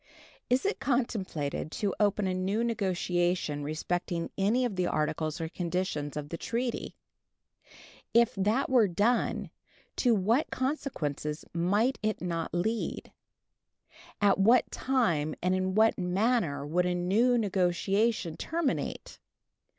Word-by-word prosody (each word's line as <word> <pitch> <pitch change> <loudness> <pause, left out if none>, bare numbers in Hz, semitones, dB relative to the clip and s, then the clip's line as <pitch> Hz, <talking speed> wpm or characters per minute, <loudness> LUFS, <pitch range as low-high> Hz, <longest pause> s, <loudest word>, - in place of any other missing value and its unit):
Is 250 +6 +2
it 405 - 0
contemplated 195 - -2
to 200 -3 -1
open 205 -1 +2
a 185 - 0
new 190 +5 0
negotiation 180 -7 0
respecting 170 +3 -2
any 220 +6 +2
of 225 -5 -2
the 180 -1 0
articles 155 +1 -1
or 165 - -2
conditions 170 -4 -3
of 145 -1 -5
the 165 - -5
treaty? 240 +1 -3 1.2
If 235 0 +4
that 210 +7 +1
were 245 -5 +4
done, 210 +7 0 0.5
to 240 -3 +3
what 220 +9 +1
consequences 165 - -3
might 205 +10 +1
it 215 0 -1
not 170 -2 -3
lead? 220 +6 -2 1.1
At 200 -1 +3
what 230 +6 +4
time 170 - 0
and 180 +1 +1
in 185 0 0
what 220 0 +4
manner 180 - +1
would 175 +4 +1
a 180 - 0
new 215 +8 +3
negotiation 195 -1 +1
terminate? 325 -3 -3
190 Hz, 125 wpm, -29 LUFS, 170-230 Hz, 1.2 s, If